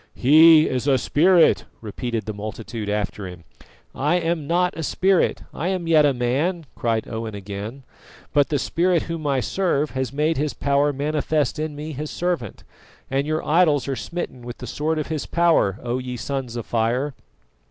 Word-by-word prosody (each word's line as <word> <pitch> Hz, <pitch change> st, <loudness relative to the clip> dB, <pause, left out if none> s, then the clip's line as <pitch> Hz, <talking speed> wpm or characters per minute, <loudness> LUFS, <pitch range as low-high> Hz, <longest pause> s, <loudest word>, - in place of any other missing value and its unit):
"He 155 Hz, +4 st, +7 dB
is 130 Hz, +1 st, -2 dB
a 135 Hz, -2 st, +4 dB
spirit," 170 Hz, +6 st, +4 dB
repeated 115 Hz, 0 st, -4 dB
the 110 Hz, -, -4 dB
multitude 110 Hz, +1 st, -6 dB
after 105 Hz, -1 st, -2 dB
him. 90 Hz, -2 st, -10 dB, 0.5 s
"I 150 Hz, +6 st, +1 dB
am 165 Hz, -3 st, -1 dB
not 180 Hz, +2 st, +1 dB
a 165 Hz, -, -4 dB
spirit, 190 Hz, +4 st, +1 dB
I 165 Hz, -, -3 dB
am 185 Hz, -2 st, -1 dB
yet 155 Hz, -3 st, +5 dB
a -, -, +3 dB
man," 140 Hz, +8 st, -1 dB
cried 115 Hz, -2 st, -1 dB
Owen 110 Hz, -1 st, -5 dB
again, 100 Hz, +6 st, -7 dB, 0.5 s
"but 145 Hz, -1 st, +3 dB
the 150 Hz, -, +1 dB
Spirit 170 Hz, +4 st, +1 dB
Whom 165 Hz, -2 st, -4 dB
I 135 Hz, -2 st, +1 dB
serve 155 Hz, -, 0 dB
has 130 Hz, -2 st, -2 dB
made 155 Hz, +3 st, 0 dB
His 150 Hz, +1 st, -1 dB
power 140 Hz, +1 st, +2 dB
manifest 150 Hz, +1 st, -1 dB
in 155 Hz, -1 st, -3 dB
me 150 Hz, +2 st, -6 dB
His 150 Hz, +1 st, -5 dB
servant, 175 Hz, -, -3 dB, 0.5 s
and 135 Hz, +2 st, 0 dB
your 155 Hz, +1 st, -1 dB
idols 155 Hz, -4 st, +3 dB
are 135 Hz, -, -1 dB
smitten 130 Hz, 0 st, -5 dB
with 120 Hz, 0 st, -8 dB
the -, -, -8 dB
sword 155 Hz, +6 st, -2 dB
of 155 Hz, -, -1 dB
His 155 Hz, -3 st, -3 dB
power, 165 Hz, -, +2 dB
O 120 Hz, +1 st, -1 dB
ye 125 Hz, -1 st, -5 dB
Sons 130 Hz, 0 st, -4 dB
of 120 Hz, -, -4 dB
Fire! 120 Hz, +5 st, 0 dB
145 Hz, 180 wpm, -22 LUFS, 120-160 Hz, 0.5 s, He